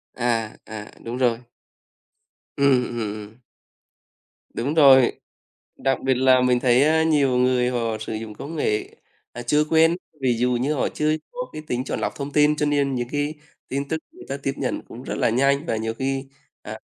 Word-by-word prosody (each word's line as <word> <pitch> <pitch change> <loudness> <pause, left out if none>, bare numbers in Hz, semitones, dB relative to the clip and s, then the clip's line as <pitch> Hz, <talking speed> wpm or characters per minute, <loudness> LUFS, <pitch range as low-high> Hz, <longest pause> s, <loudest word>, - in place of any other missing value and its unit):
À, 115 -3 -1
à, 105 -1 -7 0.2
đúng 115 +2 -5
rồi. 120 -2 +1 1.1
Ừm, 140 -3 +4
ừm, 120 - -6
ừm. 105 +2 -6 1.1
Đúng 135 +6 -2
rồi. 135 -5 +7 0.7
Đặc 135 0 0
biệt 135 0 +3
là 130 0 +5
mình 125 -1 +3
thấy, 125 +1 +4
a, 160 +2 +3
nhiều 145 -5 +2
người 125 0 +2
họ 115 -3 -1
sử 110 - -5
dụng 110 0 -6
công 145 +9 -8
nghệ, 105 -8 -1 0.4
à, 120 - -6
chưa 150 +5 +3
quen, 165 +1 +4 0.3
ví 125 -3 +1
dụ 125 +2 +1
như 130 +5 0
họ 140 - 0
chưa 155 +1 0 0.2
có - - -5
cái 155 - -6
tính 125 -3 -1
chọn - - -3
lọc - - -2
thông 140 0 -5
tin 150 +1 +4
cho 150 - 0
nên 140 -2 +1
những 120 -1 -2
cái 145 +1 -1 0.3
tin 140 +1 -3
tức 160 - -1
người 365 - -14
ta 135 - -2
tiếp 135 - 0
nhận 130 - -2
cũng 120 - -10
rất - - -4
là - - +2
nhanh 140 +5 +2
và 115 - -1
nhiều 110 +1 -2
khi, 135 +2 -2 0.4
à, - - -8
130 Hz, 195 wpm, -23 LUFS, 120-145 Hz, 1.1 s, rồi